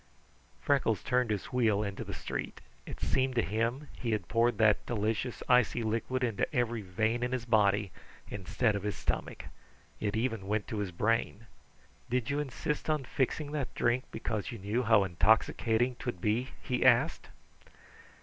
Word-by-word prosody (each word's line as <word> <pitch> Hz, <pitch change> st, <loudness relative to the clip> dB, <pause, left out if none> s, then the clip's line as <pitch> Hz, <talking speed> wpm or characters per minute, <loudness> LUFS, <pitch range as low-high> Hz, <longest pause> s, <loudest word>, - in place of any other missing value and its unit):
Freckles 120 Hz, -8 st, +2 dB
turned 125 Hz, -2 st, +1 dB
his 105 Hz, -3 st, -1 dB
wheel 110 Hz, -4 st, +2 dB
into 100 Hz, -1 st, -4 dB
the -, -, -7 dB
street. -, -, -5 dB, 0.3 s
It -, -, -7 dB
seemed 130 Hz, -1 st, +1 dB
to 120 Hz, -, +3 dB
him 115 Hz, +7 st, -1 dB
he 115 Hz, -3 st, -2 dB
had 100 Hz, -5 st, -2 dB
poured 120 Hz, +1 st, +2 dB
that 110 Hz, -2 st, +4 dB
delicious 110 Hz, +2 st, -1 dB
icy 125 Hz, -1 st, +3 dB
liquid 115 Hz, +4 st, -1 dB
into 115 Hz, -4 st, 0 dB
every 120 Hz, -2 st, 0 dB
vein 110 Hz, +5 st, 0 dB
in 125 Hz, 0 st, -1 dB
his 125 Hz, -2 st, -2 dB
body 105 Hz, -4 st, +3 dB, 0.4 s
instead 105 Hz, +3 st, 0 dB
of 100 Hz, -, -2 dB
his 105 Hz, -2 st, -2 dB
stomach. -, -, -3 dB, 0.5 s
It 105 Hz, -1 st, -1 dB
even 115 Hz, -4 st, -1 dB
went 105 Hz, +1 st, -1 dB
to 110 Hz, -, -3 dB
his 100 Hz, -2 st, -2 dB
brain. 115 Hz, +3 st, 0 dB, 0.6 s
"Did 125 Hz, +1 st, 0 dB
you 145 Hz, -, 0 dB
insist 150 Hz, +2 st, -3 dB
on 155 Hz, -3 st, +1 dB
fixing 140 Hz, +4 st, -1 dB
that 145 Hz, -4 st, -3 dB
drink 120 Hz, +2 st, +1 dB
because 110 Hz, -3 st, -3 dB
you 115 Hz, -, -6 dB
knew 105 Hz, +5 st, -1 dB
how 110 Hz, -3 st, +5 dB
intoxicating 110 Hz, +6 st, +2 dB
'twould 120 Hz, -8 st, -4 dB
be?" 110 Hz, +7 st, 0 dB
he 125 Hz, -, -1 dB
asked. -, -, +4 dB
115 Hz, 165 wpm, -31 LUFS, 105-125 Hz, 0.6 s, how